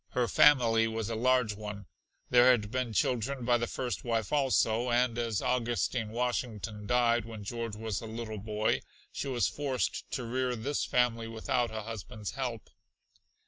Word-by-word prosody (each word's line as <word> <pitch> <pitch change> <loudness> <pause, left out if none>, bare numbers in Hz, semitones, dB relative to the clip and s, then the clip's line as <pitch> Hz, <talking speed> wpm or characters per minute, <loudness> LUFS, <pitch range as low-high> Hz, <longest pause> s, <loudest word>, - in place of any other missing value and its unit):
Her 125 -1 +1
family 115 -7 +5
was 110 0 -3
a - - -1
large 125 -1 +2
one; 105 -1 -7 0.5
there 125 +1 +7
had 110 -5 +3
been 130 -2 -1
children 125 +3 0
by 120 -1 +3
the 120 - -1
first 125 -2 -3
wife 115 -2 -1
also, 125 -4 +2
and 120 0 +2
as 115 -3 -1
Augustine 120 -2 0
Washington 115 -3 -3
died 120 -1 +3
when 110 -2 -8
George 115 +1 -4
was 110 -3 -3
a 115 - -7
little 110 -1 -5
boy, 105 +1 0 0.3
she - - -4
was 125 -3 +1
forced 140 -3 -2
to 125 - -3
rear 125 +1 -1
this 140 +6 -2
family 115 -2 +1
without 120 +2 -1
a 110 0 -5
husband's 110 -1 -6
help. 120 -6 -5
115 Hz, 165 wpm, -30 LUFS, 110-125 Hz, 0.5 s, there